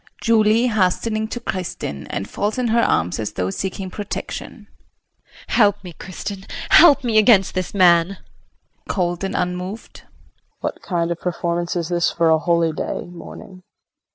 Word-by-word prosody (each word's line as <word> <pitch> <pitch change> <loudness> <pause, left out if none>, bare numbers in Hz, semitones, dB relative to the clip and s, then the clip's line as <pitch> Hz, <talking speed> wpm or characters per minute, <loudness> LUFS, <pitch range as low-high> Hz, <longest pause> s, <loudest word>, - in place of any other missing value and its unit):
] - - -28
JULIE 225 0 +4
[Hastening 215 +2 0
to 240 - -5
Kristin 180 - -5
and 95 - -4
falls 210 +3 -2
in 250 -2 0
her 235 +1 +3
arms 85 - +1
as 105 - -3
though 95 0 -2
seeking 190 - -4
protection]. 205 +1 -6 0.8
Help 205 -4 +3
me, 180 -2 -9
Kristin, 190 +3 -8 0.2
help 305 -5 +7
me 225 -3 +3
against 210 -3 +4
this 185 +1 -3
man. 170 -3 +5
KRISTIN - - -26 0.6
[Cold 175 -2 -1
and 195 - -3
unmoved]. 180 +4 -4 0.6
What - - -4
kind 170 -2 -1
of 170 - -3
performance 175 0 -2
is 170 -1 -2
this 175 -1 +1
for 165 -1 +2
a 160 - +4
holy 170 0 +1
day - - -4
morning? 185 +2 -11
185 Hz, 155 wpm, -21 LUFS, 170-215 Hz, 0.8 s, help